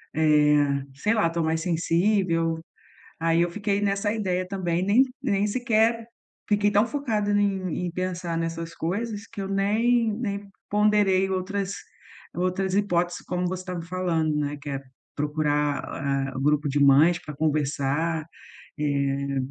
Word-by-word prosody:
eh, 150 -2 +3
sei 210 +11 +1
lá, 215 -6 +3
estou 165 0 -1
mais 160 0 0
sensível? 170 -1 +1 0.6
Aí 165 +1 +2
eu 175 - +2
fiquei 205 +1 -1
nessa 200 +1 0
ideia 185 -4 -1
também, 180 -3 -1
nem 225 +7 +5 0.2
nem 205 -6 +1
sequer 230 0 +1 0.4
fiquei 205 0 +3
tão 205 +2 +4
focada 225 -6 -1
em 195 -4 0
em 175 - -3
pensar 180 -2 -3
nessas 165 0 -4
coisas 205 +5 -3
que 205 -4 -7
eu 195 - -3
nem 220 +4 +2
nem 205 -3 -4 0.2
ponderei 205 -2 +3
outras 195 +1 -2 0.6
outras 185 +1 -1
hipóteses, 175 -4 0
como 180 0 -1
você 185 0 -3
estava 180 -2 -5
falando, 165 -3 -1
né, 145 0 -2
que 145 - -7
é 140 -1 -3 0.3
procurar, 150 -1 0
ah, 135 -1 -2
o - - -3
grupo 150 +1 +2
de 145 +1 0
mães 150 +5 +6
para 150 - -8
conversar, 150 +1 0 0.5
eh, 140 -1 -1
180 Hz, 145 wpm, -25 LUFS, 155-205 Hz, 0.6 s, mães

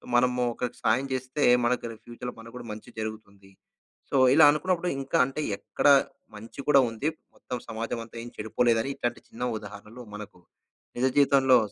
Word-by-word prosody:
మనము 125 0 +3
ఒకరికి 125 +1 -4
సాయం 120 +5 +2
చేస్తే 130 +3 -2 0.2
మనకు 120 0 0 0.2
ఫ్యూచర్‌లో 120 +1 -7
మనకు 115 +1 -12
కూడా 120 - -9
మంచి 105 +3 -9
జరుగుతుంది. 100 -3 -8 0.6
సో, - - +2 0.2
ఇలా 160 - +8
అనుకున్నప్పుడు 180 +3 0
ఇంకా 135 - 0
అంటే 135 +3 -4 0.2
ఎక్కడ - - -1 0.5
మంచి 115 +6 -12
కూడా 140 -2 +7
ఉంది. 115 +7 -1 0.3
మొత్తం 125 - -6
సమాజం 115 +1 -4
అంతా 115 - -18
ఏం 120 - -8
చెడిపోలేదని 115 +3 +1
ఇట్లాంటి 120 0 -3
చిన్న 120 - -7 0.2
ఉదాహరణలు 105 +4 -11
మనకు 105 -3 -10 0.6
నిజ 130 - +2
జీవితంలో 135 -2 +5
120 Hz, 155 wpm, -27 LUFS, 110-130 Hz, 0.6 s, ఇలా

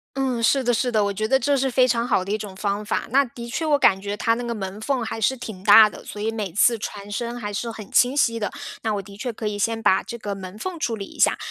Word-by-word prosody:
嗯， 255 -4 -1
是 270 +3 +3
的 245 - +2
是 245 +1 0
的， 215 -2 +2
我 200 - 0
觉 215 +2 -2
得 265 +3 +3
这 280 +3 +1
是 265 0 0
非 255 +1 +4
常 235 0 0
好 205 -6 +2
的 195 - -5
一 215 - +1
种 200 -3 -8
方 205 +1 -2
法， 205 - -2
那 275 +4 +4
的 235 -1 -9
确 310 +6 -2
我 295 -2 +3
感 190 -7 +4
觉 205 +1 -4
它 230 +2 +1
那 245 - -4
个 235 - -3
门 195 -1 -6
缝 255 +2 -1
还 225 - -4
是 240 +5 +2
挺 220 -7 -8
大 215 +1 +8
的， - - -12
所 205 - -7
以 220 +1 0
每 210 -6 -4
次 230 +4 +4
传 205 -1 -7
声 235 +3 -3
还 210 -4 -5
是 230 +3 -3
很 215 -3 -10
清 250 +2 +4
晰 230 -5 +2
的， 210 - -2 0.3
那 220 -2 0
我 200 - -2
的 200 0 -13
确 245 +2 -4
可 215 0 -4
以 210 -1 -3
先 225 +2 -1
把 190 - +3
这 - - -7
个 205 -2 -4
门 190 0 -9
缝 350 +5 -5
处 235 -6 -1
理 205 - -6
一 - - -12
下。 - - +4
225 Hz, 325 characters per minute, -23 LUFS, 205-245 Hz, 0.3 s, 大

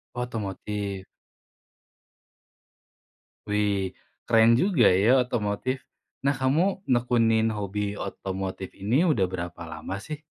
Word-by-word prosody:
Otomotif. 105 -4 -4 2.4
Wih 100 -3 0 0.3
keren 115 0 +5
juga 150 - +4
ya 110 +8 +5
otomotif! 120 +1 -1 0.5
Nah 140 - +4
kamu 155 +9 +1
nekunin 115 -3 +3
hobi 105 0 -3
otomotif 95 -1 -5
ini 115 - +1
udah 120 - +3
berapa 85 -2 -6
lama 95 - -5
sih? 155 - -6
110 Hz, 95 wpm, -26 LUFS, 100-125 Hz, 2.4 s, keren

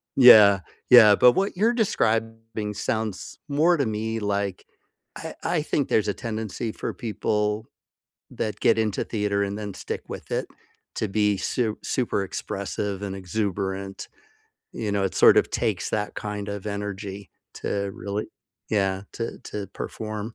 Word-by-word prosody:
yeah, 105 -6 +9 0.3
yeah, 115 -4 +9
but 125 +4 +6
what 195 0 0
you're 225 +4 +3
describing 115 - -1
sounds 110 -2 -3
more 160 +5 +4
to 140 - +1
me 110 +1 -2
like, 100 -2 -2 0.5
I - - -7
I 160 - +1
think 145 -2 -1
there's 105 - +2
a 105 - +1
tendency 110 -1 -4
for - - -4
people 105 0 -1 0.7
that 105 -1 -3
get 115 - +4
into 110 -2 0
theater 105 -2 -1
and 100 +1 -3
then 105 -2 -5
stick - - -5
with - - -8
it - - 0 0.5
to 110 - -1
be 105 0 +1
su 110 0 -1
super 120 -5 0
expressive 100 +1 -4
and 100 -1 -4
exuberant. 95 0 -3 0.6
You 105 -2 -3
know, 100 -1 +1
it 95 - -2
sort - - +7
of - - +1
takes - - -1
that 105 -1 -2
kind 105 -1 -4
of 100 0 -5
energy 100 -1 -5 0.2
to 100 -1 -2
really 100 +1 -4 0.4
yeah, 95 -2 +1
to 115 - -4
to 100 -2 -5
perform. 110 +2 -6
105 Hz, 150 wpm, -25 LUFS, 100-115 Hz, 0.7 s, yeah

